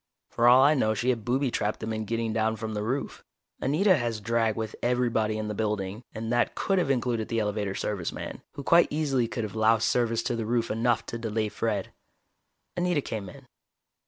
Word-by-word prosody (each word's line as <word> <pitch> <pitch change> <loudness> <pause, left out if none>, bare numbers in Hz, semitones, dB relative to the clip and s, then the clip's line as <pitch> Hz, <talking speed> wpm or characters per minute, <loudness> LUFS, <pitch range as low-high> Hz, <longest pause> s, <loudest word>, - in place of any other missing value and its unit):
For 120 - +3
all 125 +2 +8
I 145 +2 +6
know 110 -6 +1
she 125 +4 +1
had 115 -3 -3
booby 130 +2 0
trapped 105 -1 -1
them 110 0 -3
in 110 0 -3
getting 115 +1 -1
down 110 0 +1
from 110 0 -5
the 105 - -2
roof. 130 +6 -3 0.4
Anita 180 +9 +3
has 120 -4 -2
drag 115 0 +1
with 110 -1 -4
everybody 120 -3 +1
in 110 0 -3
the 105 - -3
building, 105 -1 -2
and 115 +1 -4
that 120 0 +1
could 195 -1 +1
have 175 - 0
included 120 -4 0
the 115 - -2
elevator 105 -2 -1
service 100 -5 -2
man, - - -7
who 140 - -7
quite 170 +4 +5
easily 140 -6 0
could 115 - -4
have 105 - -5
loused 110 0 +3
service 115 -2 +1
to 120 - -1
the 115 -2 -3
roof 115 0 0
enough 115 +1 +1
to 115 - -5
delay 110 -1 -1
Fred. 105 -3 -2 0.8
Anita 175 -4 +1
came 100 -4 -5
in. - - -13
115 Hz, 210 wpm, -27 LUFS, 110-125 Hz, 0.8 s, all